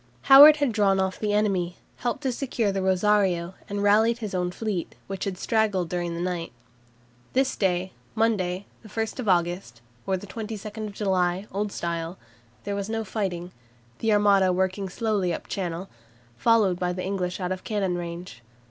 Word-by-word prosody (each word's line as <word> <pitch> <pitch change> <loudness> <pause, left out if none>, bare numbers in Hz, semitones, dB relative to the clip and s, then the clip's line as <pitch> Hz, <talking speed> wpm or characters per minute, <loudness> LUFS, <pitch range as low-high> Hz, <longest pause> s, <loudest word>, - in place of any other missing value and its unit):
Howard 285 +2 +10
had 285 -4 +1
drawn 200 -3 +2
off 190 0 0
from 215 - -3
the 205 - +1
enemy, 190 -4 0 0.2
helped 240 -1 -3
to 265 - +1
secure 240 -4 -1
the 195 0 -2
"Rosario," 190 -2 +2 0.2
and 200 0 -2
rallied 220 +3 +4
his 215 -4 -5
own 180 -1 0
fleet, 195 -2 -4
which 195 -1 -4
had 195 -2 -3
straggled 205 -5 +1
during 175 -1 -2
the - - -4
night. 175 -1 -3 0.8
This 265 +1 +2
day, 185 -1 0 0.2
Monday, 200 -4 0 0.2
1 220 0 -3 0.2
August 175 -9 0 0.3
(or 190 -1 +1
22 215 +1 -6
July, 190 -2 0
Old 205 +1 -2
Style), 170 0 -3 0.5
there 200 - -3
was 200 +1 -3
no 225 0 -1
fighting, 185 -4 -3 0.5
the 225 - +1
Armada 200 -2 +4
working 190 +1 -1
slowly 205 -3 0
up - - -4
Channel, 180 -1 -3 0.5
followed 205 - +3
by 180 -1 0
the 185 0 -4
English 185 -2 -2
out 180 -1 -2
of 185 0 -4
cannon 195 -4 -1
range. 170 -7 -6
195 Hz, 165 wpm, -26 LUFS, 180-215 Hz, 0.8 s, Howard